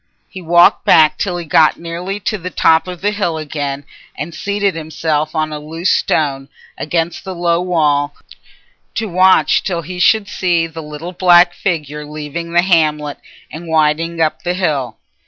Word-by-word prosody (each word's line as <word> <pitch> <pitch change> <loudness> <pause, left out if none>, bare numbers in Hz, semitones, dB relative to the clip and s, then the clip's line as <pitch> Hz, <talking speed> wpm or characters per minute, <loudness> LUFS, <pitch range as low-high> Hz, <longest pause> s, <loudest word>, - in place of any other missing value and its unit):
He 185 - -10
walked 175 +1 +4
back 155 -1 +4
till 180 -3 -2
he 175 - -6
got 155 0 +3
nearly 175 +4 -5
to 215 +2 -2
the 180 +1 -5
top 160 -1 +2
of 180 -2 -7
the 205 +1 +1
hill 190 -6 -2
again, 145 -2 -4 0.3
and 155 +4 -5
seated 200 +2 -1
himself 155 -1 -2
on 155 -1 -1
a 150 - -5
loose 165 +4 -2
stone, 135 -3 0 0.3
against 165 +2 -2
the 190 -2 -6
low 170 0 +1
wall, 150 -5 0 0.8
to 225 - -1
watch 185 0 +3
till 170 -3 -3
he 180 +3 -7
should 210 +3 +3
see 175 -4 0
the 165 0 -8
little 150 +3 -8
black 175 -1 +5
figure 150 -6 -3
leaving 150 +3 -6
the 175 +1 +3
hamlet 150 -5 +1 0.3
and 165 +2 -9
winding 160 +1 +1
up 160 -1 0
the 175 0 -2
hill. 140 - -2
165 Hz, 170 wpm, -16 LUFS, 150-180 Hz, 0.8 s, black